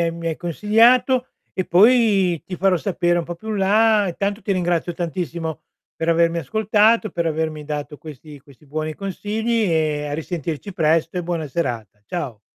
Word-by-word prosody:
hai 170 Hz, 0 st, +1 dB
mi 165 Hz, 0 st, -7 dB
hai 160 Hz, -, -3 dB
consigliato 230 Hz, -, +3 dB, 0.3 s
e 185 Hz, -, -2 dB
poi 200 Hz, -4 st, +4 dB
ti 185 Hz, -, -5 dB
farò 190 Hz, 0 st, +2 dB
sapere 175 Hz, -1 st, 0 dB
un 170 Hz, -, -2 dB
po' 175 Hz, -, -6 dB
più 220 Hz, +6 st, -11 dB
in 210 Hz, -, -2 dB
là. 210 Hz, +1 st, +3 dB
Intanto 200 Hz, +4 st, -3 dB
ti 200 Hz, -, -1 dB
ringrazio 175 Hz, -2 st, -1 dB
tantissimo 170 Hz, -2 st, -4 dB, 0.3 s
per 165 Hz, -, -3 dB
avermi 170 Hz, 0 st, +3 dB
ascoltato, 220 Hz, +2 st, +2 dB
per 170 Hz, -1 st, -2 dB
avermi 155 Hz, -1 st, -2 dB
dato 150 Hz, 0 st, -5 dB
questi 150 Hz, 0 st, -11 dB
questi 140 Hz, +1 st, -20 dB
buoni 155 Hz, +2 st, -4 dB
consigli 215 Hz, +4 st, -2 dB
e 155 Hz, -2 st, 0 dB
a -, -, -5 dB
risentirci 165 Hz, +3 st, -5 dB
presto, 165 Hz, -1 st, +1 dB
e 180 Hz, -, -2 dB
buona 165 Hz, -2 st, -3 dB
serata. 115 Hz, -, -4 dB
Ciao. 130 Hz, -10 st, -5 dB
170 Hz, 170 wpm, -21 LUFS, 155-205 Hz, 0.3 s, poi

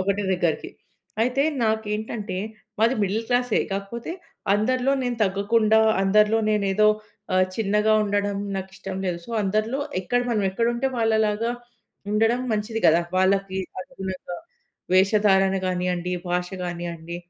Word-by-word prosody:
ఒకటే 200 Hz, +2 st, 0 dB
దగ్గరికి. 175 Hz, -3 st, -1 dB, 0.5 s
అయితే 255 Hz, +3 st, +1 dB, 0.2 s
నాకేంటంటే 220 Hz, -1 st, -2 dB, 0.4 s
మాది 230 Hz, +4 st, +3 dB
మిడిల్ 205 Hz, +3 st, 0 dB
క్లాసే, 245 Hz, -1 st, +2 dB
కాకపోతే 200 Hz, +9 st, -4 dB, 0.4 s
అందరిలో 255 Hz, +5 st, +1 dB
నేను 245 Hz, -1 st, -1 dB
తగ్గకుండా 215 Hz, +3 st, +2 dB, 0.2 s
అందరిలో 210 Hz, +3 st, +4 dB
నేనే 205 Hz, -2 st, +1 dB
ఏదో 215 Hz, +1 st, +5 dB, 0.5 s
ఆహ్, 185 Hz, 0 st, +5 dB
చిన్నగా 210 Hz, 0 st, +2 dB
ఉండడం 205 Hz, 0 st, 0 dB, 0.2 s
నాకిష్టం 190 Hz, 0 st, -6 dB
లేదు. 180 Hz, -2 st, -1 dB
సో, -, -, -10 dB
అందరిలో 215 Hz, +6 st, 0 dB, 0.2 s
ఎక్కడ 245 Hz, +6 st, 0 dB
మనమెక్కడుంటే 230 Hz, +4 st, 0 dB
వాళ్ళలాగా 220 Hz, 0 st, +1 dB, 0.6 s
ఉండడం 225 Hz, +3 st, +2 dB
మంచిది 220 Hz, +1 st, -1 dB
కదా! 165 Hz, +2 st, +5 dB, 0.2 s
వాళ్ళకి 190 Hz, 0 st, +2 dB, 0.2 s
అనుగుణంగా 185 Hz, -4 st, -6 dB, 0.6 s
వేషధారణ 195 Hz, 0 st, +4 dB
కానియండి, 180 Hz, -1 st, -1 dB
భాష 180 Hz, 0 st, -1 dB
కానియండి. 170 Hz, -1 st, -5 dB
205 Hz, 115 wpm, -24 LUFS, 190-225 Hz, 0.6 s, ఏదో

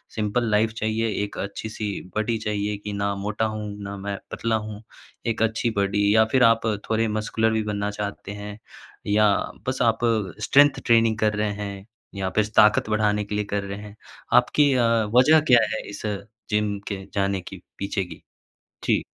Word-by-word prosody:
Simple 110 Hz, +2 st, 0 dB
life 110 Hz, +1 st, +3 dB
चाहिए, 110 Hz, +1 st, -1 dB, 0.2 s
एक 100 Hz, -, -6 dB
अच्छी 100 Hz, +2 st, -5 dB
सी 105 Hz, -1 st, -4 dB, 0.2 s
बॉडी 110 Hz, +1 st, 0 dB
चाहिए 105 Hz, -1 st, -2 dB
कि 105 Hz, 0 st, -6 dB
ना 100 Hz, 0 st, -1 dB
मोटा 105 Hz, +3 st, -2 dB
हूँ, 110 Hz, -1 st, -4 dB, 0.2 s
ना 100 Hz, 0 st, -5 dB
मैं 100 Hz, 0 st, -4 dB
पतला 115 Hz, -1 st, -1 dB
हूँ। 105 Hz, -1 st, -5 dB, 0.5 s
एक 115 Hz, -1 st, -1 dB
अच्छी 110 Hz, +1 st, 0 dB
बॉडी 100 Hz, +1 st, +2 dB
या 110 Hz, -, +7 dB
फिर 130 Hz, -2 st, +4 dB
आप 115 Hz, -1 st, +4 dB, 0.2 s
थोड़े 115 Hz, 0 st, +2 dB
मस्कुलर 110 Hz, +1 st, 0 dB
भी 110 Hz, -, 0 dB
बनना 105 Hz, -1 st, -2 dB
चाहते 100 Hz, -1 st, -5 dB
हैं? 105 Hz, +1 st, -8 dB, 0.5 s
या 105 Hz, +1 st, +4 dB, 0.4 s
बस -, -, -1 dB
आप -, -, +3 dB, 0.5 s
स्ट्रेंथ 145 Hz, 0 st, +5 dB
ट्रेनिंग 115 Hz, -2 st, +4 dB
कर 105 Hz, -1 st, +2 dB
रहे 105 Hz, 0 st, 0 dB
हैं, 100 Hz, -1 st, -6 dB, 0.3 s
या 95 Hz, -1 st, -2 dB
फिर 110 Hz, -1 st, +3 dB
ताक़त 105 Hz, 0 st, +5 dB
बढ़ाने 105 Hz, -1 st, +1 dB
के 105 Hz, -, -4 dB
लिए 105 Hz, 0 st, -1 dB
कर 100 Hz, 0 st, 0 dB
रहे 100 Hz, 0 st, -5 dB
हैं? 105 Hz, 0 st, -11 dB, 0.4 s
आपकी 145 Hz, -2 st, +4 dB
अ, 125 Hz, -, +3 dB, 0.3 s
वजह 150 Hz, +6 st, +7 dB
क्या 120 Hz, -, +8 dB
है, -, -, -3 dB
इस 100 Hz, -, -8 dB, 0.5 s
जिम 105 Hz, -1 st, 0 dB
के 95 Hz, -2 st, -5 dB
जाने 100 Hz, -2 st, 0 dB
के -, -, -10 dB, 0.2 s
पीछे 100 Hz, 0 st, -1 dB
की? 85 Hz, -3 st, -12 dB, 0.6 s
जी। -, -, +2 dB
105 Hz, 180 wpm, -24 LUFS, 100-110 Hz, 0.6 s, क्या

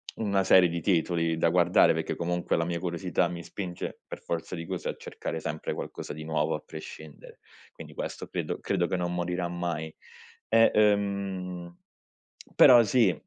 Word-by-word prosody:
una 100 Hz, -3 st, 0 dB
serie 95 Hz, -1 st, +6 dB
di 85 Hz, 0 st, -3 dB
titoli 85 Hz, -2 st, +1 dB
da 80 Hz, -, +2 dB
guardare 85 Hz, +1 st, +4 dB
perché -, -, -3 dB
comunque 85 Hz, 0 st, -1 dB
la 85 Hz, -, 0 dB
mia 85 Hz, 0 st, -2 dB
curiosità 90 Hz, 0 st, -1 dB
mi 85 Hz, -1 st, -6 dB
spinge 90 Hz, -2 st, -6 dB
per -, -, -9 dB
forza 85 Hz, +1 st, -4 dB
di 85 Hz, -1 st, -6 dB
cose -, -, -4 dB
a -, -, -4 dB
cercare 80 Hz, -, -6 dB
sempre 75 Hz, 0 st, -4 dB
qualcosa -, -, -6 dB
di 80 Hz, +1 st, -7 dB
nuovo 80 Hz, 0 st, 0 dB
a -, -, -4 dB
prescindere. 80 Hz, -1 st, -11 dB, 0.3 s
Quindi -, -, -11 dB
questo -, -, -6 dB
credo -, -, -4 dB
credo 85 Hz, -, 0 dB
che 95 Hz, -, -1 dB
non 90 Hz, 0 st, -2 dB
morirà 90 Hz, 0 st, -2 dB
mai. 85 Hz, -2 st, -4 dB, 0.6 s
E, 115 Hz, 0 st, +5 dB
ehm, 100 Hz, -4 st, 0 dB, 0.8 s
però 120 Hz, -2 st, +9 dB
sì, 110 Hz, -4 st, +3 dB
90 Hz, 165 wpm, -28 LUFS, 85-95 Hz, 0.8 s, però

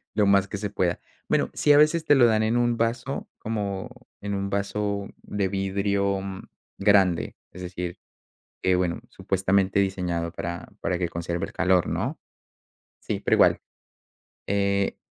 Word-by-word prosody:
lo 105 Hz, -, +3 dB
más 100 Hz, -1 st, +4 dB
que 100 Hz, -, -5 dB
se 105 Hz, +1 st, -3 dB
pueda. 90 Hz, -3 st, 0 dB, 0.3 s
Bueno, -, -, +2 dB
sí, 150 Hz, -, +3 dB
a -, -, +6 dB
veces 155 Hz, +2 st, +4 dB
te 145 Hz, -, +5 dB
lo 130 Hz, -3 st, +6 dB
dan 110 Hz, -2 st, +3 dB
en 110 Hz, +2 st, +1 dB
un 120 Hz, -1 st, +2 dB
vaso 115 Hz, +4 st, -2 dB
como 105 Hz, -1 st, -3 dB, 0.3 s
en 100 Hz, 0 st, -3 dB
un 100 Hz, 0 st, -2 dB
vaso 100 Hz, 0 st, -2 dB, 0.2 s
de 100 Hz, -2 st, -1 dB
vidrio, 100 Hz, +1 st, 0 dB
mm, 95 Hz, -1 st, -6 dB, 0.4 s
grande, 95 Hz, -4 st, +3 dB, 0.2 s
es 90 Hz, -, -10 dB
decir, 90 Hz, -1 st, -5 dB, 0.7 s
que 95 Hz, -, +3 dB
bueno, 90 Hz, -2 st, -1 dB
supuestamente 95 Hz, +1 st, +1 dB
diseñado 90 Hz, -4 st, -1 dB
para 85 Hz, 0 st, -5 dB
para 90 Hz, -, -1 dB
que 90 Hz, -1 st, -1 dB
conserve 85 Hz, +1 st, -3 dB
el -, -, -12 dB
calor, 90 Hz, -1 st, +2 dB
¿no? -, -, -2 dB, 0.8 s
Sí, -, -, -3 dB
pero -, -, +2 dB
igual, -, -, +4 dB, 0.9 s
eh 100 Hz, 0 st, +1 dB
100 Hz, 160 wpm, -25 LUFS, 90-105 Hz, 0.9 s, a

